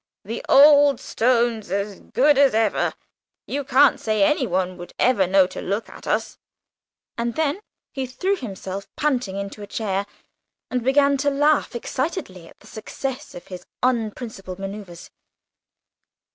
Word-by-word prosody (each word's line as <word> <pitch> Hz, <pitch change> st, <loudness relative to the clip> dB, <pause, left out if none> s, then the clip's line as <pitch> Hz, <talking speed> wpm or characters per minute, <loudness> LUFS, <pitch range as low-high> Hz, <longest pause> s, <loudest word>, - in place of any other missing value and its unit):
"The 225 Hz, +3 st, -5 dB
old 285 Hz, 0 st, +7 dB
stone's 235 Hz, -3 st, 0 dB
as 200 Hz, +1 st, -3 dB
good 290 Hz, +3 st, +2 dB
as 275 Hz, -5 st, +5 dB
ever. 220 Hz, -2 st, +1 dB, 0.5 s
You 285 Hz, +1 st, -3 dB
can't 275 Hz, +1 st, +4 dB
say 215 Hz, -2 st, +1 dB
anyone 190 Hz, -8 st, +1 dB
would 175 Hz, 0 st, -10 dB
ever 220 Hz, -8 st, +3 dB
know, 190 Hz, 0 st, +5 dB
to 185 Hz, -, -7 dB
look 200 Hz, +4 st, -3 dB
at -, -, -12 dB
us." -, -, -1 dB, 0.8 s
And 235 Hz, 0 st, -2 dB
then 315 Hz, +3 st, 0 dB, 0.3 s
he 265 Hz, -1 st, -3 dB
threw 370 Hz, +11 st, -1 dB
himself 195 Hz, -, -7 dB
panting 250 Hz, -10 st, -1 dB
into 200 Hz, +1 st, -6 dB
a 205 Hz, -, -8 dB
chair, 200 Hz, -2 st, -2 dB, 0.6 s
and 250 Hz, -2 st, -1 dB
began 280 Hz, +2 st, +3 dB
to 285 Hz, +1 st, +1 dB
laugh 290 Hz, -1 st, +2 dB
excitedly 240 Hz, -, -4 dB
at -, -, -18 dB
the -, -, -18 dB
success 265 Hz, +5 st, -6 dB
of 175 Hz, -, -10 dB
his 180 Hz, -1 st, -8 dB, 0.2 s
unprincipled 220 Hz, -6 st, -2 dB
manoeuvres. 195 Hz, -3 st, -8 dB
230 Hz, 145 wpm, -22 LUFS, 195-275 Hz, 0.8 s, old